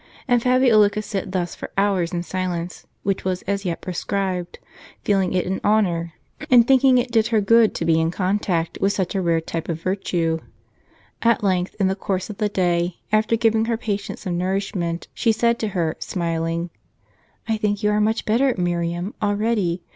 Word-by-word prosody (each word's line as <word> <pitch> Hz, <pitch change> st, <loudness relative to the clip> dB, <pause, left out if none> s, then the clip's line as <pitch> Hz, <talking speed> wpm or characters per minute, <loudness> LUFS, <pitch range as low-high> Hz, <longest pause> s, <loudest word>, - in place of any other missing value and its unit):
And 245 Hz, -2 st, +3 dB
Fabiola 250 Hz, -4 st, +5 dB
could 210 Hz, +1 st, -4 dB
sit 195 Hz, -3 st, -4 dB
thus 180 Hz, -2 st, -2 dB
for -, -, -8 dB
hours 195 Hz, -4 st, +1 dB
in 175 Hz, -1 st, -2 dB
silence, 180 Hz, -1 st, -4 dB, 0.2 s
which 195 Hz, -1 st, -1 dB
was 185 Hz, -1 st, -2 dB
as 200 Hz, 0 st, -2 dB
yet 170 Hz, -2 st, -2 dB
prescribed; 185 Hz, -1 st, -3 dB, 0.5 s
feeling 195 Hz, -3 st, +1 dB
it 185 Hz, -1 st, 0 dB
an 190 Hz, +1 st, -2 dB
honor, 175 Hz, -6 st, +1 dB, 0.4 s
and 240 Hz, -2 st, +6 dB
thinking 265 Hz, -1 st, +5 dB
it 245 Hz, 0 st, 0 dB
did 225 Hz, -1 st, +3 dB
her 225 Hz, -2 st, +2 dB
good, 225 Hz, +2 st, +4 dB
to 165 Hz, -, -2 dB
be 165 Hz, -1 st, +3 dB
in 160 Hz, -, +1 dB
contact 180 Hz, -2 st, -1 dB
with 195 Hz, +1 st, +2 dB
such 190 Hz, -3 st, -2 dB
a 195 Hz, -, 0 dB
rare 170 Hz, -2 st, +2 dB
type 165 Hz, +1 st, -5 dB
of 165 Hz, -1 st, -2 dB
virtue. 175 Hz, -4 st, -1 dB, 0.8 s
At 230 Hz, -2 st, +2 dB
length, 185 Hz, -2 st, 0 dB
in 195 Hz, -, +3 dB
the 190 Hz, -, 0 dB
course 190 Hz, 0 st, -3 dB
of 205 Hz, -, -10 dB
the 210 Hz, -1 st, +1 dB
day, 175 Hz, -2 st, 0 dB
after 215 Hz, +1 st, +3 dB
giving 225 Hz, -1 st, +2 dB
her 230 Hz, -1 st, 0 dB
patient 205 Hz, -3 st, -3 dB
some 175 Hz, -3 st, -3 dB
nourishment, 185 Hz, -2 st, -2 dB
she 230 Hz, -, +2 dB
said 235 Hz, +1 st, +1 dB
to 220 Hz, -, -1 dB
her, 175 Hz, -6 st, -1 dB
smiling: 165 Hz, -1 st, -2 dB, 0.8 s
"I 220 Hz, -1 st, 0 dB
think 210 Hz, 0 st, -1 dB
you 210 Hz, -, +3 dB
are 210 Hz, 0 st, +2 dB
much 220 Hz, +2 st, 0 dB
better, 245 Hz, +4 st, +2 dB
Miriam, 175 Hz, +2 st, -2 dB
already. 205 Hz, -4 st, 0 dB
195 Hz, 185 wpm, -22 LUFS, 175-215 Hz, 0.8 s, and